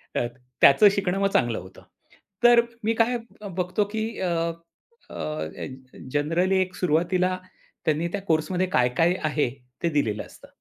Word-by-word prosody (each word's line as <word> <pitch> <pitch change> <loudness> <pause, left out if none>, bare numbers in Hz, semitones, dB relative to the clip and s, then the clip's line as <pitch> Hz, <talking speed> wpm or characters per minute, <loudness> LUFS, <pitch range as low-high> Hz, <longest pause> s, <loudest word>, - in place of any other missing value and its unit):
अ, - - +1 0.4
त्याचं 205 +9 +8
शिकणं 195 -1 0
मग 195 - +3
चांगलं 120 -2 +2
होतं. 95 +1 -13 0.6
तर 240 0 +8 0.2
मी 225 +1 +2
काय 235 +2 +2 0.4
बघतो 180 +3 0
की 220 0 -1
अ, 185 - 0 0.8
अ, - - -11
अ, 75 0 -3
ए - - -5 0.5
जनरली 170 +6 +2
एक 185 0 -3
सुरुवातीला 180 +2 +1 0.5
त्यांनी 155 +2 +1
त्या 200 - -2
कोर्समध्ये 180 +4 +1
काय-काय 125 +8 +3
आहे 150 -4 +1 0.3
ते 170 - +3
दिलेलं 115 -9 0
असतं. - - -16
175 Hz, 145 wpm, -25 LUFS, 145-195 Hz, 0.8 s, त्याचं